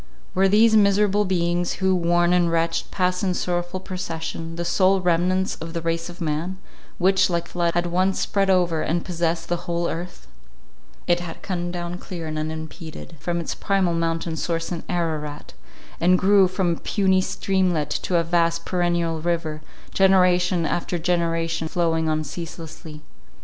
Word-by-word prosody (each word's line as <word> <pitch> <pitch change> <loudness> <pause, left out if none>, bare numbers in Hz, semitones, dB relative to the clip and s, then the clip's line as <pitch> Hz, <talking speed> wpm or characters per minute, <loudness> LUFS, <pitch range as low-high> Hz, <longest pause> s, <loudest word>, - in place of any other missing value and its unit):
Were 195 +1 +3
these 220 +2 +5
miserable 205 0 +4
beings, 175 -1 0
who, 190 -1 +1
worn 175 0 +2
and 175 -2 +3
wretched, 165 0 0
passed 180 -1 0
in 185 -2 +1
sorrowful 175 +1 -2
procession, 165 -3 -5
the 170 0 -3
sole 190 +2 +3
remnants 180 +1 +1
of 165 +1 -7
the 170 - -3
race 165 +1 -1
of 175 - -11
man, 165 +3 -2 0.4
which, 190 +1 +3
like 170 -1 -1
a - - -17
flood, 170 -1 0
had 175 0 +1
once 185 +2 +1
spread 195 -1 +1
over 175 -4 +2
and 170 +2 -1
possessed 170 -1 -1
the 175 0 -3
whole 170 0 0
earth? 175 +2 -6 0.8
It 175 0 +2
had 175 -2 -8
come 175 -2 -2
down 175 0 -5
clear 175 -4 -7
and 155 -1 -3
unimpeded 160 +1 -7
from 170 +3 -2
its 170 - -3
primal 195 -3 +1
mountain 165 0 -1
source 165 +1 -2
in 170 - -3
Ararat, 155 -4 -3 0.5
and 180 +2 +4
grew 195 0 +5
from 185 -1 0
a 165 - -3
puny 190 -2 +2
streamlet 185 -6 0
to 180 - 0
a 170 - +2
vast 170 0 +1
perennial 170 -3 0
river, 160 -2 -2 0.3
generation 180 -2 +4
after 175 +2 -1
generation 165 -1 0
flowing 165 -2 0
on 155 0 0
ceaselessly. 160 0 -8
175 Hz, 165 wpm, -23 LUFS, 165-185 Hz, 0.8 s, these